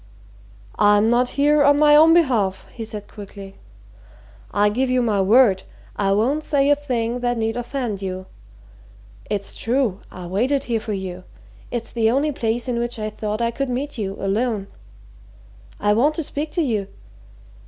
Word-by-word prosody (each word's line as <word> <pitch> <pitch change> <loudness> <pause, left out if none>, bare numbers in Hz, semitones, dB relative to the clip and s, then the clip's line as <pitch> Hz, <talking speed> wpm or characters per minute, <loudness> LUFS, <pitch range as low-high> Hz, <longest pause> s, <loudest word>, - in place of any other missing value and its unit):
"I'm 205 +2 +4
not 245 +1 +2
here 295 +1 +4
on 285 0 +5
my 295 0 +6
own 315 +2 +7
behalf," 240 - +2
he 230 - -7
said 215 -2 -6
quickly. 200 -2 -10 1.0
"I 205 0 +3
give 255 +5 0
you 255 0 +2
my 210 -4 +1
word 200 -1 +4 0.3
I 195 -1 0
won't 260 +9 +1
say 285 -1 +2
a - - +6
thing 245 -4 -2
that 245 -1 -1
need 225 0 -1
offend 245 -4 -3
you. 185 -1 -5 1.0
It's 200 -1 -3
true 235 -5 0
I 180 -1 -9
waited 250 +10 0
here 235 -4 -1
for 215 0 -5
you 185 -2 -5 0.5
it's 235 -1 -4
the 225 -2 +2
only 280 +5 +1
place 235 -1 -1
in 240 -2 -1
which 240 +1 -2
I 215 0 -4
thought 215 +1 -3
I 235 - +1
could 275 +2 -3
meet 265 +1 -3
you, 195 -2 -3
alone. 200 +1 -1 1.1
I 205 0 +2
want 285 +8 +2
to 325 - -2
speak 295 +2 -4
to 345 - +1
you. 215 -8 -1
230 Hz, 170 wpm, -21 LUFS, 205-265 Hz, 1.1 s, own